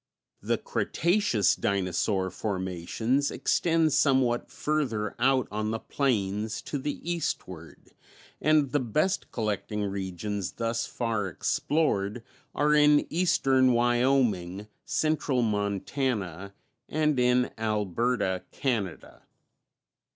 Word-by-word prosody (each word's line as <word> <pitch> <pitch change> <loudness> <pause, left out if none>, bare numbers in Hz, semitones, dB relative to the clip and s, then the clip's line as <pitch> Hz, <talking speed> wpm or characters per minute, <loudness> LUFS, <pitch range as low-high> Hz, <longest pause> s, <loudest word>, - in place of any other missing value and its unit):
The - - 0
Cretaceous 170 - +1
Dinosaur 95 0 0
formations 100 +8 -1
extend 165 -3 +1
somewhat 130 -4 +2
further 125 -9 -1
out 130 -1 +3
on 105 +1 -2
the 110 - -1
plains 110 -5 -1
to 145 - -4
the 145 +2 -3
eastward, 95 - -4 0.5
and 150 -3 +3
the 145 - +2
best 155 - 0
collecting 105 -2 -2
regions 100 0 -3
thus 115 0 -2
far 115 -4 -2
explored 105 - 0 0.3
are 150 +1 +3
in 150 0 +5
eastern 135 -7 +3
Wyoming, 120 -6 +1 0.2
central 140 -2 0
Montana 100 - -2 0.3
and 150 -3 +1
in 125 0 +3
Alberta, 105 -1 0
Canada. 110 -10 -3
120 Hz, 95 wpm, -28 LUFS, 100-140 Hz, 0.5 s, in